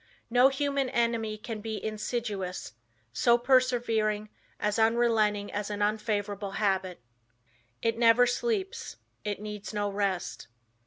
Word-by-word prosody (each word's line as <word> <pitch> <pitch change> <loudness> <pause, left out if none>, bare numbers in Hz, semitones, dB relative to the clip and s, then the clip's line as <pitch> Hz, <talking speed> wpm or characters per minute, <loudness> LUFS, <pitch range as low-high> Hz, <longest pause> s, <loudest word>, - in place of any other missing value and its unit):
No 250 +2 +7
human 275 -1 0
enemy 230 -3 0
can 215 0 -6
be 220 0 -4
as - - -4
insidious, 210 - -3 0.4
so 235 - +4
persevering, 235 -4 +2 0.3
as 210 +1 0
unrelenting 220 -3 +2
as 205 0 -2
an 205 0 -1
unfavorable 205 -2 -1
habit. 190 -3 0 0.8
It 230 0 +1
never 235 +1 +6
sleeps, 440 - -2 0.3
it 205 -2 -3
needs 210 0 -7
no 205 -1 0
rest. 195 -2 -2
215 Hz, 120 wpm, -29 LUFS, 205-240 Hz, 0.8 s, No